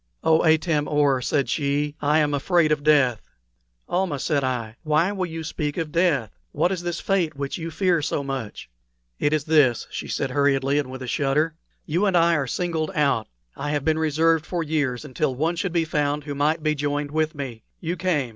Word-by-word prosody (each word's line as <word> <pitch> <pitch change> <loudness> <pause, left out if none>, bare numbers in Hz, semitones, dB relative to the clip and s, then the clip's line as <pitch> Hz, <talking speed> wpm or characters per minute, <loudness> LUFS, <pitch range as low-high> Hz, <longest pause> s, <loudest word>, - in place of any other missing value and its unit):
"Oh, 160 0 +4
Atam 160 -2 +2
or," 145 -3 +2
said 140 +1 0
she, 145 +2 -1
"I 150 +1 +3
am 150 -2 +2
afraid 155 +2 +2
of 150 -1 +1
death!" 140 -6 +4 0.7
"Almah," 175 -4 0
said 140 +1 0
I, 120 -3 -3
"why 160 +4 +2
will 190 -3 -2
you 165 -1 -6
speak 150 -2 -3
of 160 -2 -3
death? 155 - +1 0.2
What 180 - +1
is 185 -3 -2
this 175 -1 -3
fate 180 -6 0
which 140 +4 -4
you 165 0 -4
fear 175 -1 +1
so 145 0 -1
much?" 135 -6 -5 0.5
"It 145 - +1
is 155 -2 +1
this," 145 -6 +3
said - - -5 0.2
she - - -6
hurriedly 140 0 +2
and 140 -3 -3
with 130 0 -7
a - - -6
shudder, 150 +5 +1 0.3
"you 175 +7 +1
and 185 -2 +3
I 170 0 +4
are 140 -3 -1
singled 160 +1 -1
out. 140 -7 +1 0.3
I 145 - -4
have 145 -2 -1
been 160 0 +2
reserved 160 +1 +2
for 175 -2 -2
years 145 -4 -1
until 135 0 -1
one 160 +6 0
should 180 +2 -2
be 165 -1 +1
found 150 -1 -1
who 145 0 -5
might 150 +3 0
be 155 -1 +2
joined 145 0 -2
with 155 +1 0
me. 130 -6 -6 0.2
You 170 +1 -3
came. 165 -8 0
150 Hz, 205 wpm, -24 LUFS, 140-165 Hz, 0.7 s, Oh